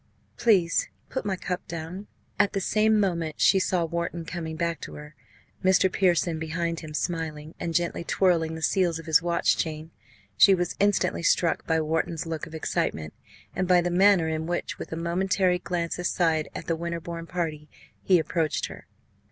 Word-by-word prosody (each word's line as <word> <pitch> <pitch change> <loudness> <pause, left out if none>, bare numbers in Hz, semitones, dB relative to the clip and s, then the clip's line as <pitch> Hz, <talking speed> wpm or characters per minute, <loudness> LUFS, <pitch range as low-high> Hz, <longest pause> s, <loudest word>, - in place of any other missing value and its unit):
Please 185 -7 +2 0.2
put 260 - -4
my 195 - 0
cup 180 0 -4
down." 170 +5 -6 0.3
At 205 -1 +3
the 195 - 0
same 215 +2 +2
moment 170 -6 -1
she 195 - +5
saw 180 -2 +1
Wharton 170 0 -3
coming 160 -2 -5
back 170 -1 -2
to - - -8
her 150 0 -10 0.5
Mr. 190 0 +4
Pearson 175 -3 +2
behind 165 +1 -2
him, 155 -2 -8
smiling, 160 -2 -3
and 165 -1 -3
gently 170 0 0
twirling 170 -3 +1
the 160 - -7
seals 175 -3 +2
of 165 - -9
his 160 -1 +4
watch 170 0 +1
chain. 155 0 -4 0.4
She 195 - +7
was 175 -1 -2
instantly 205 -3 +2
struck 170 0 +1
by 160 -1 +2
Wharton's 160 +1 -1
look 165 -2 -4
of 160 - -10
excitement, 80 - -2 0.4
and 185 - 0
by 180 -1 +5
the 175 0 0
manner 190 -2 +5
in 160 0 -2
which 175 0 -3
with - - -7
a - - -2
momentary 180 +2 +1
glance 175 -1 -3
aside 165 -3 +1
at - - -6
the 165 - 0
Winterbourne 170 0 -5
party 155 -4 -4 0.3
he 185 - +4
approached 160 -2 0
her. - - -11
170 Hz, 175 wpm, -26 LUFS, 160-180 Hz, 0.5 s, She